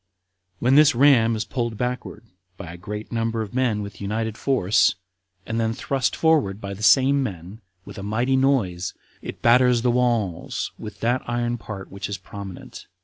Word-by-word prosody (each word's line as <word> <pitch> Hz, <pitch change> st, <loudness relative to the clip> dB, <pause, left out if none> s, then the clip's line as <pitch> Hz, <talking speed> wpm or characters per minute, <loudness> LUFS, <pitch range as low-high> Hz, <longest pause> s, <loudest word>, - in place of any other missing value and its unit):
When 125 Hz, +7 st, +2 dB
this 150 Hz, 0 st, +6 dB
ram 120 Hz, -4 st, +5 dB
is 110 Hz, 0 st, -3 dB
pulled 120 Hz, -3 st, -3 dB
backward 125 Hz, +1 st, -4 dB, 0.3 s
by 85 Hz, -4 st, -8 dB
a -, -, -10 dB
great 105 Hz, +4 st, -7 dB
number 115 Hz, -1 st, -1 dB
of 105 Hz, -, -10 dB
men 120 Hz, -5 st, 0 dB
with 100 Hz, -1 st, -9 dB
united 110 Hz, +2 st, -2 dB
force, 110 Hz, -8 st, +2 dB, 0.5 s
and 115 Hz, +1 st, -2 dB
then 115 Hz, 0 st, 0 dB
thrust 135 Hz, +2 st, -1 dB
forward 150 Hz, -12 st, +2 dB
by 100 Hz, -2 st, -6 dB
the 100 Hz, -, -10 dB
same 135 Hz, +5 st, +5 dB
men, 100 Hz, -2 st, -6 dB, 0.2 s
with -, -, -9 dB
a -, -, -6 dB
mighty 120 Hz, +6 st, 0 dB
noise, 115 Hz, -10 st, +1 dB, 0.3 s
it -, -, -8 dB
batters 125 Hz, 0 st, +4 dB
the 125 Hz, -, +3 dB
walls 120 Hz, -8 st, -1 dB
with 105 Hz, -, -9 dB
that 120 Hz, +2 st, +1 dB
iron 120 Hz, 0 st, -1 dB
part 100 Hz, -3 st, -8 dB
which 100 Hz, +1 st, -6 dB
is 100 Hz, -, -3 dB
prominent. 95 Hz, 0 st, -10 dB
115 Hz, 175 wpm, -23 LUFS, 100-125 Hz, 0.5 s, this